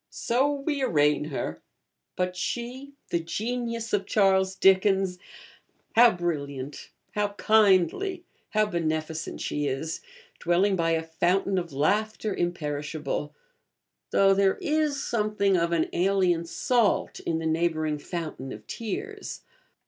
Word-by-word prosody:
'So 260 Hz, +5 st, +1 dB
we 285 Hz, 0 st, -2 dB
arraign 150 Hz, -, +2 dB
her; 145 Hz, -2 st, -4 dB, 0.5 s
but 180 Hz, 0 st, -1 dB
she,' 250 Hz, +8 st, -4 dB, 0.2 s
the 170 Hz, -, +2 dB
Genius 230 Hz, +6 st, -3 dB
of 200 Hz, -2 st, +1 dB
Charles 190 Hz, -2 st, +3 dB
Dickens, 190 Hz, -1 st, +3 dB, 0.8 s
how 240 Hz, +1 st, +8 dB
brilliant, 145 Hz, -, -4 dB, 0.2 s
how 205 Hz, -1 st, -1 dB
kindly, 215 Hz, -, +3 dB, 0.3 s
how 215 Hz, 0 st, +2 dB
beneficent 160 Hz, -4 st, -3 dB
she 145 Hz, 0 st, -1 dB
is! 140 Hz, +4 st, -3 dB, 0.4 s
dwelling 185 Hz, +4 st, +2 dB
by 165 Hz, -2 st, +1 dB
a 160 Hz, 0 st, 0 dB
fountain 180 Hz, +4 st, +1 dB
of 170 Hz, -2 st, -6 dB
laughter 210 Hz, +9 st, 0 dB
imperishable; 150 Hz, -3 st, -3 dB, 0.7 s
though 195 Hz, 0 st, +5 dB
there 195 Hz, 0 st, +3 dB
is 300 Hz, -2 st, 0 dB
something 210 Hz, -3 st, +1 dB
of 170 Hz, -1 st, +1 dB
an 165 Hz, -2 st, +2 dB
alien 180 Hz, -2 st, +2 dB
salt 230 Hz, +5 st, +1 dB
in 165 Hz, -, -2 dB
the 165 Hz, -, -4 dB
neighbouring 160 Hz, -2 st, 0 dB
fountain 155 Hz, -5 st, -5 dB
of -, -, -9 dB
tears. 395 Hz, -, -5 dB
185 Hz, 120 wpm, -27 LUFS, 160-215 Hz, 0.8 s, how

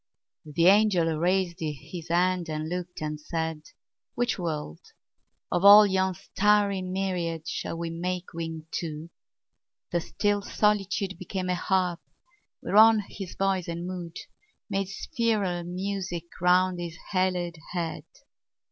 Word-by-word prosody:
The 160 Hz, +3 st, +1 dB
angel 185 Hz, -5 st, +5 dB
raised 180 Hz, 0 st, +1 dB
his 160 Hz, +2 st, -6 dB
hand 175 Hz, 0 st, +1 dB
and 155 Hz, 0 st, -3 dB
looked 180 Hz, 0 st, -5 dB
and 150 Hz, 0 st, -4 dB
said, 160 Hz, 0 st, -3 dB, 0.5 s
"Which 245 Hz, -3 st, 0 dB
world, 150 Hz, -, -4 dB, 0.7 s
of 175 Hz, -, +1 dB
all 205 Hz, +1 st, +10 dB
yon 190 Hz, -1 st, +1 dB
starry 200 Hz, +1 st, +2 dB
myriad 180 Hz, -3 st, -2 dB
Shall 165 Hz, -, -3 dB
we 170 Hz, 0 st, -3 dB
make 180 Hz, +1 st, -4 dB
wing 165 Hz, -1 st, -5 dB
to?" 160 Hz, 0 st, -6 dB, 0.8 s
The 175 Hz, -, +1 dB
still 205 Hz, +4 st, 0 dB
solitude 200 Hz, -3 st, 0 dB
Became 185 Hz, 0 st, -4 dB
a -, -, +2 dB
harp 180 Hz, -1 st, 0 dB, 0.6 s
whereon 220 Hz, +1 st, +6 dB
his 195 Hz, -3 st, -7 dB
voice 195 Hz, -2 st, 0 dB
and 170 Hz, +1 st, -4 dB
mood 180 Hz, -2 st, -6 dB, 0.5 s
Made 195 Hz, -1 st, 0 dB
spheral 200 Hz, -4 st, -1 dB
music 185 Hz, -1 st, -3 dB, 0.2 s
round 180 Hz, 0 st, +3 dB
his 170 Hz, -1 st, -5 dB, 0.2 s
haloed 180 Hz, -3 st, 0 dB
head. 170 Hz, -2 st, -3 dB
180 Hz, 125 wpm, -27 LUFS, 170-195 Hz, 0.8 s, all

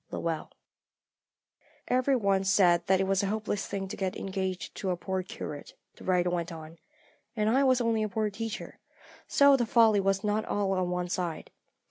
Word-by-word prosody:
LOWELL. 165 Hz, -2 st, -3 dB, 1.4 s
"Every 255 Hz, +2 st, +2 dB
one 200 Hz, -5 st, +1 dB
said 185 Hz, -3 st, +3 dB
that 190 Hz, 0 st, +4 dB
it -, -, +2 dB
was 195 Hz, 0 st, +1 dB
a 200 Hz, -, -1 dB
hopeless 210 Hz, -1 st, -2 dB
thing 195 Hz, -1 st, -4 dB
to -, -, -5 dB
get 190 Hz, -1 st, -2 dB
engaged 190 Hz, -1 st, -4 dB
to 190 Hz, -, -3 dB
a 180 Hz, -, 0 dB
poor 190 Hz, +1 st, -2 dB
curate," 150 Hz, -5 st, -8 dB, 0.2 s
the -, -, -14 dB
writer 180 Hz, -1 st, +1 dB
went 170 Hz, -1 st, -2 dB
on, 160 Hz, 0 st, -10 dB, 0.6 s
"and 215 Hz, -2 st, 0 dB
I 270 Hz, +3 st, +3 dB
was 255 Hz, -2 st, +3 dB
only 230 Hz, -2 st, +1 dB
a 215 Hz, -, -1 dB
poor 215 Hz, +1 st, -1 dB
teacher, 225 Hz, +2 st, -6 dB, 0.5 s
so 280 Hz, -1 st, +6 dB
the 240 Hz, -3 st, 0 dB
folly 220 Hz, -3 st, +5 dB
was 195 Hz, +1 st, +1 dB
not 210 Hz, +1 st, 0 dB
all 200 Hz, -1 st, -1 dB
on 185 Hz, -2 st, 0 dB
one 180 Hz, 0 st, -2 dB
side. 175 Hz, -3 st, -3 dB
195 Hz, 185 wpm, -29 LUFS, 180-220 Hz, 1.4 s, so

